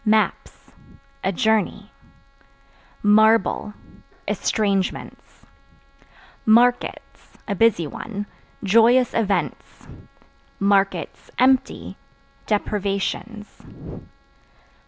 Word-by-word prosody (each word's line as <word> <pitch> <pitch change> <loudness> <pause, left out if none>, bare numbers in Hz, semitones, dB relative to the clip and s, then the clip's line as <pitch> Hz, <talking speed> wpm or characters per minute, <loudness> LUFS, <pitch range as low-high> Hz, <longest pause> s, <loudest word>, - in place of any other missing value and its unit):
Maps 215 -1 -1 0.5
A 190 - +1
journey. 210 +1 0 1.1
Marble 210 0 +3 0.5
Estrangements. 200 -4 -2 1.0
Markets 240 +3 +1
(A 205 - -1
busy 200 -4 +2
one) 205 +7 -6 0.4
joyous 230 +5 +4
events; 205 -3 -2 1.5
(empty) 260 0 +1 0.5
deprivations. 210 +1 -3
215 Hz, 50 wpm, -22 LUFS, 200-230 Hz, 1.5 s, joyous